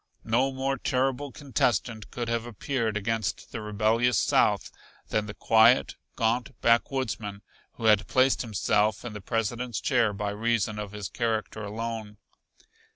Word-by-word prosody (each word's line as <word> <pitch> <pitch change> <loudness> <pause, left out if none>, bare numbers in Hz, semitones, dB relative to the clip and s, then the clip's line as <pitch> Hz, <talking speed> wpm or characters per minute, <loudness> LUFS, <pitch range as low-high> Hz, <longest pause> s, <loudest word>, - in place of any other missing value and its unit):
No 125 +5 +2
more 135 0 -2
terrible 135 +2 0
contestant 120 -5 -1
could 120 -1 -4
have 115 0 -1
appeared 115 -1 -2
against 110 0 -2
the 115 - -5
rebellious 110 +2 +2
South 95 - +2 0.4
than 105 -1 0
the 100 - -7
quiet, 115 +3 +4 0.2
gaunt 120 +3 -1
backwoodsman 115 -4 0 0.3
who 115 - -7
had 105 -2 +4
placed 130 +1 +3
himself 105 -1 +1
in 115 - -5
the 105 - -7
President's 115 +1 -2
chair 110 +3 +2
by 100 0 -3
reason 105 0 0
of 105 -2 -5
his 105 -2 -5
character 110 0 -2
alone. 110 0 -5
115 Hz, 140 wpm, -27 LUFS, 105-120 Hz, 0.4 s, quiet